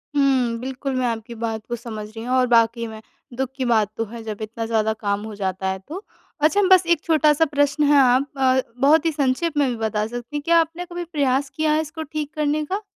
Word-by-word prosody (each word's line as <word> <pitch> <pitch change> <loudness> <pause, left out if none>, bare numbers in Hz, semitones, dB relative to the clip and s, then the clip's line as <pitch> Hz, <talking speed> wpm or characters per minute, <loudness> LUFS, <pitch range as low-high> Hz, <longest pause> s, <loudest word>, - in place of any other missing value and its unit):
हुँ, 260 -4 +2
बिल्कुल 265 +2 -4
मैं 255 0 0
आपकी 230 0 -4
बात 225 -1 -4
को 240 - -1
समझ 220 -3 -7
रही 225 +1 -9
हूँ 250 +1 0
और 255 -1 +3
वाक़ई 230 0 +3
में 220 -1 -9 0.4
दुख 265 -1 -1
की 260 - -1
बात 220 -4 +2
तो 225 - -1
है 235 -1 -7
जब 215 -1 -6
इतना 225 +1 -4
ज़्यादा 220 -1 +1
काम 200 -1 -1
हो 220 -1 -7
जाता 190 -1 -3
है 190 0 -3
तो। 370 +6 -7 0.4
अच्छा 320 +7 +3
बस 370 -1 +7
एक 340 -2 +2
छोटा 310 -2 +4
सा 320 +2 +3
प्रश्न 290 0 +1
है 290 0 +5
आप 260 +2 +3
अ 260 0 +3 0.2
बहुत 305 +3 +5
ही 325 - +2
संक्षेप 290 +2 0
में 285 -2 +3
भी 245 - -2
बता 220 -2 -1
सकती 240 +4 -7
हैं। 295 - -1
क्या 335 0 +4
आपने 330 +2 -2
कभी 350 0 -6
प्रयास 280 -5 0
किया 310 -1 +1
है 310 - +2
इसको 315 +1 -6
ठीक 300 0 -5
करने 300 0 0
का? 390 +7 -3
260 Hz, 240 wpm, -22 LUFS, 225-305 Hz, 0.4 s, बस